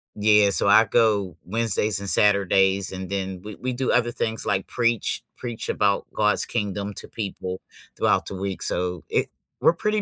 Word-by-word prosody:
Yeah, 105 Hz, -1 st, +4 dB
so 95 Hz, -, +2 dB
I 105 Hz, +2 st, +7 dB
go 105 Hz, -6 st, +1 dB
Wednesdays 110 Hz, -1 st, +1 dB
and 100 Hz, -1 st, -3 dB
Saturdays 100 Hz, -1 st, +3 dB
and 95 Hz, 0 st, -6 dB
then 95 Hz, -2 st, -4 dB
We 105 Hz, 0 st, -8 dB
we 130 Hz, -, -4 dB
do 130 Hz, +1 st, -1 dB
other 120 Hz, -1 st, +2 dB
things 110 Hz, -1 st, -3 dB
like 95 Hz, -1 st, -1 dB
preach, 115 Hz, -2 st, 0 dB, 0.2 s
preach 120 Hz, -3 st, -5 dB
about 100 Hz, -1 st, +1 dB
God's 105 Hz, -1 st, +1 dB
Kingdom 105 Hz, -2 st, -3 dB
to -, -, -6 dB
people 95 Hz, -3 st, -5 dB, 0.4 s
throughout -, -, +2 dB
the -, -, -4 dB
week, 95 Hz, 0 st, -4 dB
so 90 Hz, -1 st, -1 dB
It -, -, 0 dB, 0.3 s
we're -, -, +5 dB
pretty 210 Hz, +1 st, 0 dB
100 Hz, 175 wpm, -24 LUFS, 95-110 Hz, 0.4 s, I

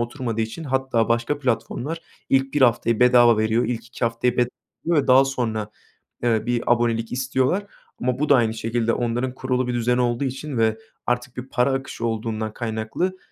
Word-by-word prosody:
oturmadığı 120 Hz, -2 st, -3 dB
için 115 Hz, +9 st, -4 dB
hatta 130 Hz, -4 st, 0 dB
başka 120 Hz, +5 st, 0 dB
platformlar 130 Hz, +4 st, -2 dB, 0.3 s
ilk 135 Hz, +1 st, +2 dB
1 145 Hz, -, +3 dB
haftayı 115 Hz, -1 st, +3 dB
bedava 120 Hz, -2 st, +6 dB
veriyor, 110 Hz, +2 st, +2 dB
ilk 120 Hz, -1 st, -3 dB
2 120 Hz, -, -4 dB
haftayı 115 Hz, +1 st, 0 dB
bed 120 Hz, -1 st, +3 dB, 0.4 s
yor 170 Hz, 0 st, +2 dB
ve 145 Hz, -, +2 dB
daha 130 Hz, +1 st, +6 dB
sonra, 110 Hz, -6 st, -2 dB, 0.5 s
eee, 115 Hz, -2 st, +2 dB
bir 120 Hz, -1 st, 0 dB
abonelik 115 Hz, -1 st, -1 dB
istiyorlar. 130 Hz, +10 st, 0 dB, 0.3 s
Ama 125 Hz, 0 st, 0 dB
bu 150 Hz, 0 st, 0 dB
da 140 Hz, -, +7 dB
aynı 115 Hz, -3 st, +2 dB
şekilde 115 Hz, +1 st, -1 dB
onların 120 Hz, +2 st, -1 dB
kurulu 130 Hz, -1 st, -1 dB
bir 125 Hz, -, -1 dB
düzeni 120 Hz, +1 st, +1 dB
olduğu 120 Hz, +2 st, 0 dB
için 135 Hz, 0 st, -4 dB
ve 110 Hz, -1 st, +2 dB, 0.3 s
artık 125 Hz, +1 st, -1 dB
bir 130 Hz, +2 st, -6 dB
para 130 Hz, +2 st, +2 dB
akışı 130 Hz, -3 st, -4 dB
olduğundan 110 Hz, -1 st, -2 dB
kaynaklı. 115 Hz, +12 st, -2 dB
120 Hz, 180 wpm, -23 LUFS, 115-130 Hz, 0.5 s, da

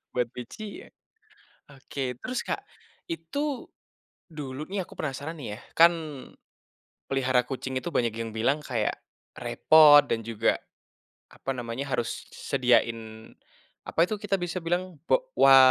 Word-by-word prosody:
buat 125 Hz, -1 st, +2 dB
Pici 200 Hz, -, -8 dB
ya. -, -, -17 dB, 0.8 s
Oke 135 Hz, -1 st, -4 dB
terus, 255 Hz, 0 st, -2 dB
Kak, -, -, -2 dB, 0.5 s
itu 265 Hz, -, -3 dB, 0.6 s
dulu 150 Hz, -2 st, -6 dB
nih 195 Hz, 0 st, -2 dB
aku -, -, -14 dB
penasaran 150 Hz, +3 st, -4 dB
nih 120 Hz, -7 st, -6 dB
ya, -, -, -12 dB, 0.2 s
kan 170 Hz, +1 st, +9 dB, 1.2 s
pelihara 130 Hz, -2 st, +2 dB
kucing 130 Hz, -1 st, -3 dB
itu 175 Hz, -, -5 dB
banyak 120 Hz, -2 st, +2 dB
yang 115 Hz, 0 st, -4 dB
bilang 125 Hz, +7 st, +2 dB
kayak 120 Hz, -7 st, -1 dB, 0.4 s
repot 145 Hz, +5 st, +7 dB
dan 115 Hz, -, -1 dB
juga 115 Hz, -1 st, +1 dB, 0.7 s
apa 135 Hz, -, -5 dB
namanya, 120 Hz, +1 st, -4 dB
harus 120 Hz, -1 st, -2 dB
s 140 Hz, -, -3 dB
sediain 115 Hz, -3 st, +1 dB, 0.6 s
apa -, -, -2 dB
itu 215 Hz, -, -1 dB
kita 200 Hz, -2 st, 0 dB
bisa 175 Hz, +1 st, -3 dB
bilang, 175 Hz, 0 st, -1 dB
bo -, -, +2 dB
wa 135 Hz, 0 st, +8 dB
135 Hz, 140 wpm, -27 LUFS, 120-165 Hz, 1.2 s, kan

